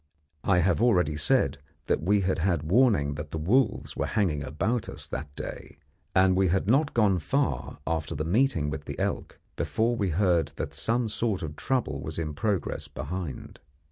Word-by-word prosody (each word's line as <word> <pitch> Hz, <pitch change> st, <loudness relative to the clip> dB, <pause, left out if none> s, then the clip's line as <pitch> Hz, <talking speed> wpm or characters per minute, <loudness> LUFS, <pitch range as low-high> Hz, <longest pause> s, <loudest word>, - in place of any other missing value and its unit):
I 90 Hz, -2 st, +3 dB
have 90 Hz, +2 st, +2 dB
already 90 Hz, -11 st, +3 dB
said 75 Hz, -2 st, +2 dB, 0.3 s
that -, -, +1 dB
we 100 Hz, +5 st, +3 dB
had 95 Hz, -2 st, 0 dB
had 85 Hz, -3 st, +1 dB
warning 100 Hz, -, +4 dB
that 75 Hz, +1 st, -6 dB
the -, -, -4 dB
wolves 105 Hz, +10 st, +1 dB
were -, -, -1 dB
hanging 90 Hz, -10 st, 0 dB
about 95 Hz, -, -1 dB
us -, -, -7 dB
that 70 Hz, +1 st, -6 dB
day, -, -, -7 dB, 0.4 s
and 95 Hz, 0 st, +5 dB
we 95 Hz, 0 st, +3 dB
had 90 Hz, +2 st, +1 dB
not 140 Hz, +8 st, +2 dB
gone 100 Hz, -5 st, +3 dB
far 130 Hz, -, -1 dB
after 80 Hz, -3 st, -2 dB
the 75 Hz, +2 st, -2 dB
meeting 85 Hz, -, +2 dB
with 75 Hz, -1 st, -5 dB
the -, -, -6 dB
elk -, -, -3 dB, 0.2 s
before 115 Hz, +2 st, 0 dB
we 100 Hz, -5 st, 0 dB
heard 85 Hz, -4 st, +2 dB
that -, -, -4 dB
some 120 Hz, +1 st, 0 dB
sort 110 Hz, -3 st, -1 dB
of 75 Hz, -1 st, -5 dB
trouble 120 Hz, -, -1 dB
was 80 Hz, +1 st, -5 dB
in 80 Hz, -2 st, -2 dB
progress 100 Hz, +4 st, -2 dB
behind. 80 Hz, +1 st, -6 dB
90 Hz, 180 wpm, -27 LUFS, 75-110 Hz, 0.4 s, and